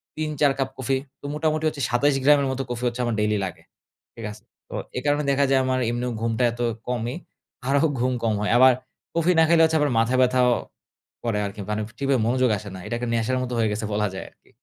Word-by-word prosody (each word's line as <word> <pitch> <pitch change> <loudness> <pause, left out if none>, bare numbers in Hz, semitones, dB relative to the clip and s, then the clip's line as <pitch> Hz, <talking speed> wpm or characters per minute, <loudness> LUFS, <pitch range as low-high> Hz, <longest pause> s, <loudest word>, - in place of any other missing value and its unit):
৩, 155 0 -2
৪ 145 - +5
cup 135 0 0
coffee. 130 +1 0 0.2
তো - - -11
মোটামুটি 155 0 0
হচ্ছে 145 -2 -3
২৭ 135 +4 +2
গ্রামের 140 -1 +5
মতো 130 +1 -2
কফি 120 +1 -4
হচ্ছে 120 +1 -2
আমার 120 - -1
ডেইলি 105 0 +1
লাগে। 90 - -7 0.5
ঠিক 115 - -7
আছে? 105 +1 -13 0.3
তো - - -10 0.2
এ - - +1
কারণে 145 +1 +2
দেখা 140 +1 +3
যায় 135 -1 +4
আমার 130 0 +1
এমনিও 120 +1 -2
ঘুমটা 115 +1 0
এত 120 +1 -7 0.3
কমই, 120 0 -2 0.5
আরো 140 +1 +3 0.2
ঘুম 130 +1 +1
কম 110 -1 +2
হয়। 105 - 0
আবার 130 0 +7 0.4
কফি 170 +2 +3
না 160 - +7
খাইলে 165 0 +5
হচ্ছে 160 0 +2
আবার 145 -3 +2
মাথা 115 +3 +2
ব্যাথাও 125 0 +4 0.7
করে 115 -3 0
আরকি 100 +1 -7
মানে 105 0 -1 0.2
ঠিক 140 - -2
ভাবে 130 -4 +3
মনোযোগ 130 0 +2
আসে 100 - -8
না। 95 - -8
এটাকে 120 +1 -3
নেশার 115 +3 0
মতো 125 - -4
হয়ে 110 -1 +2
গেছে 110 +1 -3
বলা 105 0 +1
যায় 95 - -6
আরকি। - - -31
125 Hz, 225 wpm, -24 LUFS, 115-140 Hz, 0.7 s, আবার